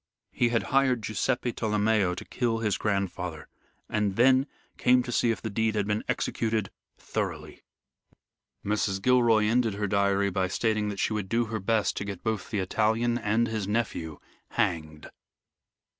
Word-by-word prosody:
He 120 - +1
had 115 -1 +1
hired 130 -5 +3
Guiseppe 120 +3 -1
Tolomeo 105 -4 +1
to - - -8
kill 115 -2 -1
his 110 -3 0
grandfather, 90 -5 -2 0.4
and 105 -2 0
then 130 +4 +4 0.3
came 125 0 +4
to 125 - -5
see 120 - +2
if 115 - -2
the 110 - -2
deed 110 +1 0
had 105 -2 +1
been 105 +1 -1
executed 110 -3 -1 0.3
thoroughly. - - -4 1.0
Mrs. 105 -1 0
Gilroy 120 -1 +4
ended 115 -1 +2
her 105 +1 -1
diary 100 0 +1
by 95 0 0
stating 110 +1 0
that 100 -2 -5
she - - 0
would 105 -3 -3
do 115 +1 +1
her 110 - -1
best 105 +1 +1
to - - -2
get 100 -2 -6
both 110 -4 -2
the 105 - -2
Italian 110 +5 +1
and 110 +1 +1
his 110 -3 -3
nephew 100 -8 -2 0.3
hanged. 75 -2 -2
110 Hz, 160 wpm, -27 LUFS, 100-115 Hz, 1.0 s, then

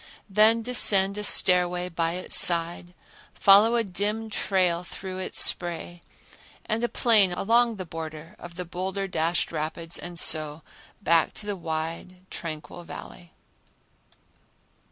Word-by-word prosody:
Then 220 +3 +3
descend 200 -5 +3
a - - -5
stairway 180 -2 +2
by 165 -1 -3
its 180 +1 -2
side, 175 +1 +5 0.4
follow 205 +4 +4
a 235 - +1
dim 210 +3 -4
trail 180 -4 -1
through 185 +1 -9
its 185 - -3
spray, 175 0 +1 0.6
and 225 +1 -3
a 240 - -1
plain 215 -5 +3
one 175 - -6
along 235 +3 +1
the 185 -2 -7
border 160 +2 -9
of 175 -1 -12
the 180 0 -6
boulder 190 +3 -5
dashed 170 -1 -2
rapids 165 +1 -5
and 175 -1 -9
so 155 -1 +3 0.4
back 165 -3 +1
to 210 - -4
the 205 -1 -4
wide, 165 +2 -7
tranquil 165 +1 -8
Valley. 170 0 -12
180 Hz, 135 wpm, -24 LUFS, 165-200 Hz, 0.6 s, side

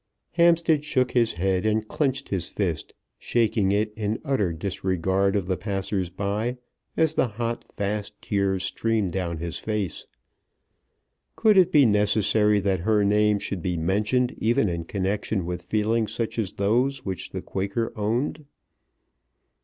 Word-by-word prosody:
Hampstead 170 -3 +3
shook 130 -4 +1
his 120 -2 +2
head 95 +2 0
and 110 0 0
clenched 140 0 -1
his 90 -4 -2
fist, 85 -7 -3 0.2
shaking 110 -4 +1
it, 105 +1 0
in 110 0 -1
utter 130 - +1
disregard 95 +2 0
of 100 -3 0
the 95 0 -1
passers 95 -3 -2
by, 100 +6 -2 0.4
as 160 -1 +3
the 130 - +2
hot, 115 +2 -3
fast 105 0 -3
tears 100 -2 0
streamed 110 -2 0
down 85 -2 -2
his 85 +1 -4
face. 105 -5 -3 1.3
Could 220 -2 +4
it 185 -1 +5
be 145 -5 +6
necessary 105 0 +3
that 95 -2 0
her 105 +3 +2
name 105 +1 +3
should 100 -2 -4
be 90 0 -1
mentioned 105 +9 +1
even 115 -1 +2
in 85 -1 -3
connection 100 0 -2
with 90 0 -4
feelings 110 +2 0
such 115 0 -3
as 100 -4 -2
those 125 +6 0
which 95 -3 -4
the - - -6
Quaker 100 +4 -2
owned. 120 +8 -1
105 Hz, 145 wpm, -25 LUFS, 95-115 Hz, 1.3 s, be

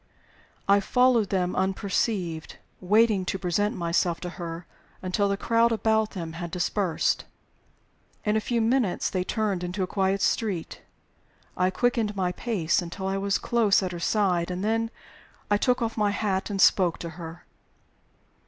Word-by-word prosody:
I 200 +1 +6
followed 245 -1 +3
them 180 -2 0
unperceived, 190 -3 -1 0.2
waiting 210 +1 +3
to 195 - -2
present 195 +3 0
myself 170 0 0
to 180 - -4
her 170 -1 -7 0.4
until 200 +2 +1
the 200 - 0
crowd 230 +2 +2
about 220 0 +2
them 165 -2 -5
had 170 +1 -5
dispersed. 180 0 0 1.0
In 210 0 +2
a 220 - +2
few 235 +1 0
minutes 230 -4 +1
they 185 -1 0
turned 200 -3 -1
into 180 +2 -2
a - - +1
quiet 190 +1 0
by - - +1
street. 195 -8 -1 0.7
I 185 +1 +2
quickened 220 +1 0
my 185 -2 0
pace 185 -5 0
until 180 +3 -6
I 195 0 0
was 200 0 +1
close 225 -5 +2
at 185 - -2
her 175 - -6
side, 180 -2 +1
and 180 +1 -3
then 225 +1 0 0.6
I 205 - +5
took 250 +3 +1
off 225 0 -3
my 210 -1 +2
hat 200 -1 -1
and 200 -1 -3
spoke 180 -3 +4
to 170 - -6
her. 165 0 -9
195 Hz, 160 wpm, -26 LUFS, 180-220 Hz, 1.0 s, I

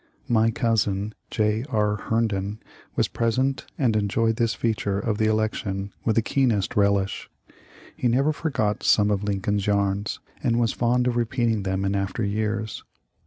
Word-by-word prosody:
My 115 -3 +3
cousin, 105 -3 0 0.2
J. 110 0 +1
R. 105 -1 +1
Herndon, 105 -2 -1 0.4
was - - +2
present 130 +4 0
and 120 -6 +2
enjoyed 110 +2 +1
this 115 -1 +1
feature 105 -3 -1
of 105 0 -1
the 110 - +3
election 105 -2 -1
with 110 - +1
the 115 - +3
keenest 120 -7 +1
relish. 100 -1 +1 0.7
He 125 - 0
never 135 +6 +2
forgot 125 -11 -1
some 105 -1 +4
of 100 0 0
Lincoln's 100 0 -1
yarns, 100 0 0 0.2
and 115 0 +1
was 115 -2 +1
fond 125 +1 +1
of 120 -1 +1
repeating 115 -2 +1
them 95 0 -1
in 100 +1 0
after 100 +3 -1
years. 110 +1 -2
110 Hz, 155 wpm, -24 LUFS, 100-115 Hz, 0.7 s, some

